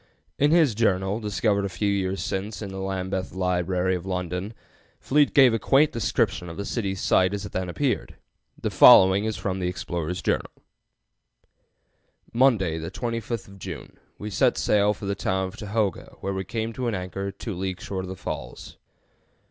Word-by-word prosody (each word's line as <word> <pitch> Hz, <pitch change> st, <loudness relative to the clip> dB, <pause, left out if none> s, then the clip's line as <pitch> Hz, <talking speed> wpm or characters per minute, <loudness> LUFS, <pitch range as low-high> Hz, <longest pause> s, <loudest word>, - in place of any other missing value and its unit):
In 145 Hz, -, +4 dB
his 160 Hz, -6 st, +4 dB
journal 100 Hz, -2 st, +1 dB
(discovered 105 Hz, -1 st, 0 dB
a 100 Hz, -, -2 dB
few 100 Hz, +2 st, -1 dB
years 95 Hz, -1 st, -1 dB
since 100 Hz, +2 st, -4 dB
in 100 Hz, -, -5 dB
the 95 Hz, -, -6 dB
Lambeth 95 Hz, -1 st, -3 dB
Library, 90 Hz, 0 st, 0 dB
London) 90 Hz, +3 st, -4 dB, 0.4 s
Fleet 145 Hz, +1 st, +3 dB
gave 130 Hz, -4 st, +6 dB
a 115 Hz, -, +1 dB
quaint 140 Hz, +6 st, +4 dB
description 100 Hz, -5 st, -1 dB
of 85 Hz, -, -8 dB
the 100 Hz, -, -4 dB
city's 100 Hz, -5 st, -2 dB
site 95 Hz, +2 st, +3 dB
as 100 Hz, 0 st, -5 dB
it -, -, -8 dB
then 95 Hz, -1 st, -3 dB
appeared. 135 Hz, +8 st, -1 dB, 0.4 s
The -, -, -2 dB
following 95 Hz, +2 st, +7 dB
is 110 Hz, -1 st, -2 dB
from 95 Hz, -1 st, -3 dB
the 90 Hz, -, -1 dB
explorer's 90 Hz, -1 st, -4 dB
journal: -, -, 0 dB, 1.8 s
"Monday, 110 Hz, -10 st, +3 dB
the 80 Hz, -, -5 dB
25th 115 Hz, -4 st, -4 dB
June, -, -, -8 dB, 0.2 s
we 105 Hz, +1 st, -6 dB
set -, -, +2 dB
sail 105 Hz, 0 st, +2 dB
for -, -, -8 dB
the 100 Hz, -, 0 dB
town 95 Hz, -1 st, -1 dB
of -, -, -13 dB
Tohoga, 105 Hz, -2 st, -2 dB
where 100 Hz, -, -2 dB
we 95 Hz, 0 st, -3 dB
came 115 Hz, +3 st, -3 dB
to 125 Hz, +1 st, -3 dB
an 115 Hz, -, -1 dB
anchor 95 Hz, +2 st, -4 dB
2 100 Hz, +3 st, -6 dB
leagues 95 Hz, 0 st, -4 dB
short 95 Hz, -1 st, -4 dB
of -, -, -8 dB
the 95 Hz, -, -5 dB
falls. 70 Hz, -8 st, -7 dB
95 Hz, 175 wpm, -25 LUFS, 95-110 Hz, 1.8 s, following